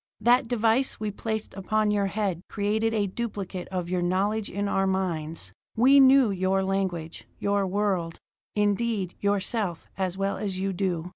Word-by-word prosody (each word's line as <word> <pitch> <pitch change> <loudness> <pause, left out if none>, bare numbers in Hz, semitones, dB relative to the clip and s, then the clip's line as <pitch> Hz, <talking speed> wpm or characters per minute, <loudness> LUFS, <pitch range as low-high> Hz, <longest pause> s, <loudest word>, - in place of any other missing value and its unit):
"That 240 +3 +4
device 230 +2 +1
we 215 -1 -2
placed 220 +1 -4
upon 210 +2 0
your 200 -1 +1
head 195 -4 -2
created 215 +2 0
a 215 -2 +1
duplicate 195 -3 -5
of 180 -2 -3
your 180 0 -1
knowledge 200 +4 0
in 200 +1 -2
our 195 -1 +1
minds. 165 - -3 0.2
We 265 +5 +6
knew 265 -4 +6
your 190 0 +1
language, 190 -4 -3
your 200 -1 0
world, 185 -4 -1 0.4
indeed, 205 -2 0
yourself, 200 -2 -1
as 190 -1 -1
well 195 0 -1
as 195 -3 -3
you 195 +1 -1
do." 180 -2 -2
200 Hz, 155 wpm, -26 LUFS, 185-215 Hz, 0.4 s, We